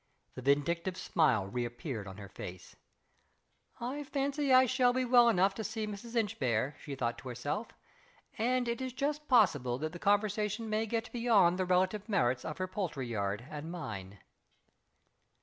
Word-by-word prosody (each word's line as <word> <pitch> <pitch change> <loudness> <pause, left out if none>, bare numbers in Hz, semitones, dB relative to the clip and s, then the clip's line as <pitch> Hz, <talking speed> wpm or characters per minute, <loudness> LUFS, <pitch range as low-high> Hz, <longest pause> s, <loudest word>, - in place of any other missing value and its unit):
The 130 - -7
vindictive 170 +7 +1
smile 135 - +2
reappeared 120 - -4
on 95 0 -9
her 100 -1 -8
face. 90 -1 -9 1.0
"I 265 +5 -3
fancy 280 0 -1
I 255 0 +8
shall 250 0 +3
be 255 0 +1
well 240 -1 +6
enough 195 -2 +3
to 220 - -5
see 220 0 -3
Mrs. 215 +3 -7
Inchbare," 145 - 0
she 140 - -6
thought 120 -2 -2
to 130 - -8
herself. 145 - -3 0.7
"And 245 +2 +1
it 235 +1 -2
is 260 -1 -3
just 300 +3 -2
possible 145 - +3
that 155 +3 -3
the 175 - -7
conversation 210 +2 +1
may 220 +1 0
get 230 +2 -2
beyond 210 -7 +3
the 185 - +1
relative 185 +4 +1
merits 125 - +1
of 155 - -5
her 185 0 -2
poultry 180 -8 -3
yard 100 0 -2
and 150 +1 -7
mine." 100 - -6
190 Hz, 165 wpm, -32 LUFS, -, 1.0 s, I